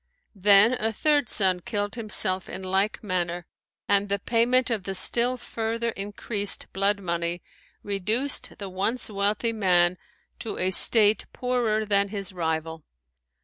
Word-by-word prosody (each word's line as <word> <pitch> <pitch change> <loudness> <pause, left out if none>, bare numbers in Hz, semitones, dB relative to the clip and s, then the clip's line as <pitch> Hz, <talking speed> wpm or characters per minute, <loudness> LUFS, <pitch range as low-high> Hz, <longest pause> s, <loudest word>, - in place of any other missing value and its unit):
Then 205 +3 +5
a 225 +1 -1
third 290 +2 +1
son 190 -3 +3
killed 205 +2 -3
himself 210 -5 -1
in 190 - -7
like 195 +4 -1
manner 175 -3 -3 0.4
and 200 0 +1
the 200 - 0
payment 240 +4 +1
of 220 -3 -1
the 195 +1 -5
still 240 +6 +1
further 230 0 -3
increased 205 0 -2
blood 200 +1 +1
money 170 -1 -3 0.4
reduced 215 +7 -1
the 200 - -7
once 200 +6 -3
wealthy 210 +3 0
man 180 -4 +2 0.4
to 225 - -6
a 185 +1 0
state 210 +2 +5
poorer 240 -4 -1
than 200 -1 +2
his 200 -1 -6
rival. 160 -2 -3
205 Hz, 140 wpm, -25 LUFS, 185-225 Hz, 0.4 s, Then